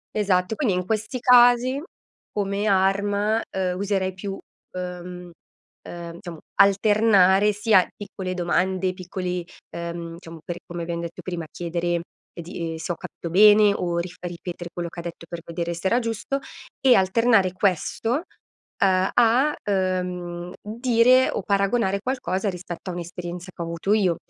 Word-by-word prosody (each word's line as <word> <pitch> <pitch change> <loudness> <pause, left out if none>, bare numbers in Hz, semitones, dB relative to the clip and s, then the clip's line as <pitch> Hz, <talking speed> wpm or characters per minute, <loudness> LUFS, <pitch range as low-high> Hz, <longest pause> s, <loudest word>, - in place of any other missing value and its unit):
Esatto, 195 -1 +1
quindi 220 -10 +1
in 180 0 -2
questi 220 +4 -2
casi 250 +1 +5 0.5
come 200 0 -1
arma, 205 +2 +2
uhm, 185 -1 -1
userei 190 -1 -1
più, 195 +1 -5 0.4
uhm, 180 0 -6 0.6
uhm, 170 -1 -7
diciamo 170 -3 -9 0.2
alternare 200 0 +5
sia 210 -2 +4
piccole 195 -2 -6
domande, 185 +1 0
piccoli, 180 -1 -4 0.3
uhm, 170 0 -5
diciamo 165 -2 -11
per 175 - -5
come 175 0 -6
abbiam 170 0 -3
detto 170 -1 -6
prima, 175 -3 -5
chiedere 170 0 -2 0.3
di 170 -1 -5
ehm, - - -5
se 165 +3 -4
ho - - -2
capito 170 - -8
bene, 205 +3 +7
o 175 -3 -2
rif 180 +1 -5
ripetere 175 0 -6
quello 175 -1 -4
che 170 - -10
ha - - -6
detto 170 0 -7
per 170 -1 -6
vedere 170 0 -3
se 170 +3 -2
era 240 +5 +3
giusto, 230 +4 -2 0.5
e 260 - +8
alternare 195 0 +3
questo, 195 +4 0
uhm 285 - 0 0.9
a, 245 +5 +4 0.2
uhm, 180 -2 -2
dire 240 +3 +4
o - - -3
paragonare 200 +1 +1
qualcosa 205 -6 -1
rispetto 180 0 -7
a - - -3
un'esperienza 175 +1 -6
che - - -8
ho - - -2
avuto 170 +4 -1
io, 190 -6 +3
185 Hz, 150 wpm, -24 LUFS, 175-210 Hz, 0.9 s, e